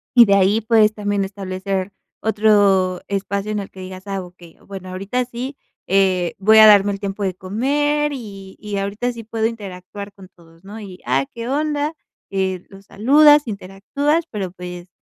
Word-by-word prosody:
Y 240 -1 +9
de 200 - +3
ahí, 200 +2 +3
pues, 220 -1 +4
también 205 -1 -1
establecer 190 0 -4 0.3
otro 205 -4 +3
espacio 200 +1 -2
en 210 - -1
el 200 - -6
que 190 - -14
digas: 185 +1 -9
"Ah, 195 -1 -3
ok, 180 0 -16 0.3
bueno, 190 -2 -8
ahorita 195 +7 -2
sí, 250 +3 -6 0.3
eh, 185 -2 +2
voy 215 +3 +5
a 220 0 +10
darme 205 -1 +6
el 195 - -5
tiempo 200 0 -4
de 190 -2 -1
comer, 290 +10 0
y 200 -7 -9
y 210 -1 -5
ahorita 205 +5 -2
sí 230 -1 -9
puedo 220 0 -2
interactuar 200 -2 -6
con 195 -2 -14
todos", 165 0 -21
¿no? 210 +3 -9
Y, 190 -2 -10
ah, 135 +2 +1
¿qué 235 0 -6
onda? 295 +2 -1 0.4
Eh, 190 -2 -2
los 195 0 -15
saludas, 295 +6 +5
interactúas, 220 - -2
pero, 195 -4 -4
pues, 180 0 -9
200 Hz, 175 wpm, -20 LUFS, 190-225 Hz, 0.4 s, a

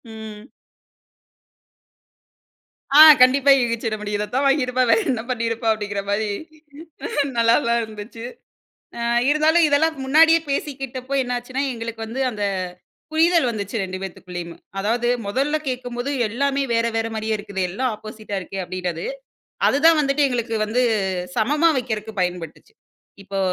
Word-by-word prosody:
ம். 220 -1 -9 2.6
ஆ. - - +7 0.2
கண்டிப்பா. 270 +2 +5
யூகிச்சிட 230 -2 -1
முடியும். 210 0 -3
இத 210 - -1
தான் 270 +2 +1
வாங்கியிருப்பா. 255 -2 +2
வேற 225 - +5
என்ன 235 -4 -1
பண்ணியிருப்பா 230 -1 -1
அப்டிங்கிற 205 -2 -4
மாரி. 210 +1 0 1.1
நல்லாதா 235 +1 +3
இருந்துச்சு. 220 +1 -9 0.7
ஆ - - -3 0.3
இருந்தாலும் 315 +3 +4
இதெல்லாம் 315 +2 +2
முன்னாடியே 320 +4 +5
பேசிக்கிட்டப்போ, 270 -2 -4
என்னாச்சுன்னா 250 +1 -3
எங்களுக்கு 230 -1 -6
வந்து 240 +4 -5
அந்த 210 -2 -4 0.7
புரிதல் 325 -2 +3
வந்துச்சு 205 -2 -5
2 185 0 -5
பேத்துக்குள்ளேயும். 175 -2 -7 0.2
அதாவது 235 +4 0 0.2
முதல்ல 275 +8 0
கேட்கும்போது 245 0 -4 0.2
எல்லாமே 275 +5 0
வேற 230 0 +2
வேற 225 0 0
மாரியே 220 0 -2
இருக்குது. 200 -2 -5
எல்லாம் 250 +7 -1
ஆப்போசிட்டா 215 -1 -8
இருக்கே 190 +1 -7
அப்டின்றது. 180 - -4 0.6
அதுதான் 315 +3 +4
வந்துட்டு 280 0 +1
எங்களுக்கு 235 -2 -2
வந்து 230 +4 0 0.5
சமமா 295 +9 +3
வைக்கிறக்கு 220 -3 -4
பயன்பட்டுச்சு. 180 - -4 0.5
இப்போ 195 0 -5
235 Hz, 120 wpm, -21 LUFS, 210-270 Hz, 2.6 s, ஆ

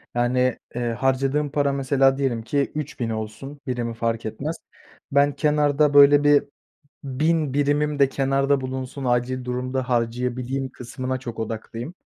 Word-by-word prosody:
Yani, 125 +1 +1 0.2
eee, 120 -1 -1
harcadığım 135 +4 0
para 140 -1 +1
mesela 135 0 +2
diyelim 125 -5 -1
ki 140 +3 -1
3.000 140 -6 -3
olsun, 110 +6 -6
birimi 120 -2 -2
fark 115 0 -2
etmez. 135 +9 -4 0.5
Ben 140 +1 +3
kenarda 150 -1 +2
böyle 145 0 +7
bir 145 -1 +5 0.6
1.000 150 +1 0
birimim 145 +1 +1
de 135 -1 +5
kenarda 135 0 +1
bulunsun, 130 +1 -5
acil 125 +1 0
durumda 125 +1 -3
harcayabileyim 125 +2 -1
kısmına 130 +1 -5
çok 120 -3 -7
odaklıyım. 115 +5 -5
130 Hz, 135 wpm, -23 LUFS, 125-145 Hz, 0.6 s, böyle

